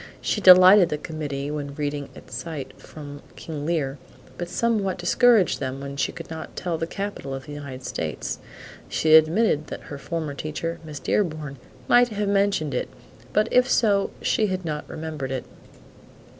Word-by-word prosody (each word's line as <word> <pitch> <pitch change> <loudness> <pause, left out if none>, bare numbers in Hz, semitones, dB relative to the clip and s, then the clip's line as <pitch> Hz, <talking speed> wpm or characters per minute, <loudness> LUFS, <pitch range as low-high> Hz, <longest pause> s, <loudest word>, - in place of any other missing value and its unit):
She 210 - -1
delighted 185 0 +9
the 150 - -1
committee 145 -2 -4
when 145 -2 -5
reading 145 -1 -3
at - - -14
sight 145 -6 -6
from 145 -2 -10
"King 150 -2 -6
Lear," 145 -5 -1 0.4
but 175 0 -5
somewhat 205 -1 0
discouraged 210 - +4
them 130 0 -3
when 140 0 -6
she 140 - 0
could - - -9
not 160 -1 -8
tell 175 -2 -2
the 165 - -2
capital 195 -9 -5
of 135 - -8
the 150 - -9
United 140 -3 -8
States. - - -4 0.5
She 155 0 +2
admitted 160 0 +5
that - - -7
her 140 - -6
former 160 -1 -4
teacher, 160 +3 -4
Miss 150 -2 -7
Dearborn, 155 -7 -1 0.3
might 245 0 +6
have 210 -3 -2
mentioned 195 -7 +1
it, 125 - -2 0.4
but 215 +1 +2
if 250 +1 +4
so 205 -4 +3
she 215 - +2
had 185 -2 -3
not 150 -2 -4
remembered 155 -4 -5
it. 130 -1 -3
160 Hz, 170 wpm, -24 LUFS, 145-190 Hz, 0.5 s, delighted